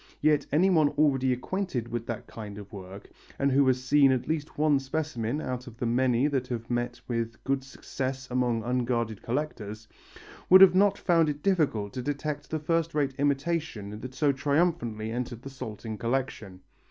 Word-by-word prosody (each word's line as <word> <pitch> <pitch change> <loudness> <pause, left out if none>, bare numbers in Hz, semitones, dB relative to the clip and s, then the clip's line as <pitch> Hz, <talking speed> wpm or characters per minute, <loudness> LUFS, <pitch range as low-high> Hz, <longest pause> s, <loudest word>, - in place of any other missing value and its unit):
Yet 150 -1 +2
anyone 160 -1 +4
already 135 -3 +3
acquainted 125 - -2
with 120 -1 -4
that 115 -2 -4
kind 105 -3 -8
of 105 +1 -11
work, 95 0 -10 0.3
and 140 0 +1
who 135 +1 +4
had 130 - +5
seen 135 +2 +4
at 130 -2 -1
least 155 -1 -3
one 150 -2 +3
specimen 135 -3 -2
out 125 -3 -4
of 115 -2 -11
the 120 - -2
many 125 +1 +2
that 135 -4 0
have 115 -1 -5
met 120 0 -2
with 115 -2 -3
good 135 0 0
success 130 0 -5
among 120 -3 +1
unguarded 120 -3 -1
collectors, 110 -5 -4 0.6
would 190 -1 +9
not 200 +1 +4
have - - -19
found 165 -3 +4
it 145 0 -5
difficult 145 - +1
to 130 - -3
detect 145 +2 -3
the 160 - -1
first 165 +1 -1
rate 140 -3 +1
imitation 140 -7 -1
that 130 0 -8
so 145 +1 +3
triumphantly 140 -6 0
entered 120 0 -4
the 135 - -7
Salting 110 -4 -7
collection. 115 -6 -3
130 Hz, 175 wpm, -28 LUFS, 115-150 Hz, 0.6 s, would